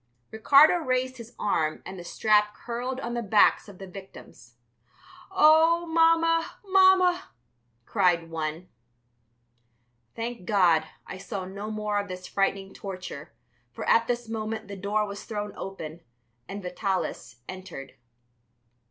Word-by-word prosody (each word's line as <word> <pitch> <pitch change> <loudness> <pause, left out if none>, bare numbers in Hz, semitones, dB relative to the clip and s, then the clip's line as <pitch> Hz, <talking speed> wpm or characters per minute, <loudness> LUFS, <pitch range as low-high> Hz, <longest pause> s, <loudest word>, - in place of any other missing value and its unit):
Ricardo 280 +9 +6
raised 255 -4 -1
his 235 0 -11
arm 155 -7 -1
and 190 -1 -8
the - - -8
strap 210 +3 +2
curled 245 +2 -4
on 235 -1 -4
the 240 - -2
backs 210 0 +3
of 195 - -13
the 195 - -9
victims. 150 -10 -13 0.7
"Oh, 330 -1 +5
Mamma, 330 0 +3
Mamma," 375 -2 +4 0.6
cried 170 -2 +1
one. 160 +2 -4 1.5
Thank 230 -4 -5
God, 175 -6 +3 0.2
I 190 - -8
saw 195 -1 -5
no 200 +3 -7
more 210 -1 -1
of 200 - -4
this 185 -1 -7
frightful 195 0 -1
torture, 185 -2 -8 0.4
for - - -7
at 230 0 +4
this 240 -1 -2
moment 220 -1 -4
the 200 - -7
door 205 +2 -1
was 200 0 -7
thrown 210 -2 -5
open 170 -4 -7 0.5
and 200 0 -7
Vitalis 180 - -3
entered. 185 -7 -9
210 Hz, 130 wpm, -26 LUFS, 185-245 Hz, 1.5 s, Ricardo